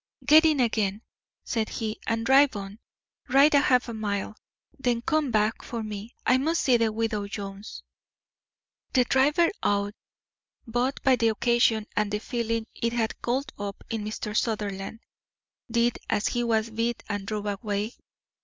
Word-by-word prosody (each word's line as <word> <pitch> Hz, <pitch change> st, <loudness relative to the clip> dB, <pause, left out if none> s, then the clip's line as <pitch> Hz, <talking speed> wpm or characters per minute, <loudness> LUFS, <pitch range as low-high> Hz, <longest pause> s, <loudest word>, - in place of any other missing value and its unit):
"Get 310 Hz, +2 st, +7 dB
in 310 Hz, -3 st, +3 dB
again," 215 Hz, -4 st, 0 dB, 0.4 s
said 225 Hz, -3 st, -1 dB
he, 220 Hz, -1 st, -4 dB
"and 225 Hz, 0 st, 0 dB
drive 270 Hz, 0 st, +5 dB
on. 200 Hz, +1 st, -7 dB, 0.5 s
Ride 275 Hz, +3 st, +5 dB
a 285 Hz, -, +7 dB
half 250 Hz, -3 st, +3 dB
mile, 215 Hz, -2 st, -3 dB, 0.4 s
then 240 Hz, -3 st, 0 dB
come 310 Hz, -2 st, +1 dB
back 215 Hz, -1 st, +1 dB
for 230 Hz, -2 st, -5 dB
me. 215 Hz, +2 st, -7 dB
I 255 Hz, +1 st, +4 dB
must 320 Hz, +5 st, 0 dB
see 255 Hz, -, +4 dB
the 230 Hz, -1 st, +1 dB
widow 215 Hz, -2 st, -2 dB
Jones." 200 Hz, 0 st, -7 dB, 1.1 s
The 255 Hz, -, +5 dB
driver, 295 Hz, +7 st, +3 dB
awed 200 Hz, 0 st, 0 dB, 0.7 s
both 245 Hz, +3 st, -1 dB
by 260 Hz, -2 st, +4 dB
the 230 Hz, -1 st, +2 dB
occasion 225 Hz, 0 st, +2 dB
and 210 Hz, -1 st, 0 dB
the 210 Hz, -, 0 dB
feeling 230 Hz, -1 st, -2 dB
it 230 Hz, 0 st, -2 dB
had 225 Hz, -2 st, -2 dB
called 260 Hz, +4 st, -2 dB
up 200 Hz, -1 st, -5 dB
in 225 Hz, -2 st, -2 dB
Mr. 210 Hz, 0 st, -5 dB
Sutherland, 210 Hz, -1 st, -2 dB, 0.7 s
did 235 Hz, +1 st, +1 dB
as 210 Hz, -, +1 dB
he 240 Hz, -1 st, -1 dB
was 225 Hz, -1 st, 0 dB
bid 230 Hz, +2 st, -2 dB
and 205 Hz, -2 st, -4 dB
drove 210 Hz, -1 st, -3 dB
away. 205 Hz, +2 st, -2 dB
225 Hz, 155 wpm, -26 LUFS, 210-245 Hz, 1.1 s, Get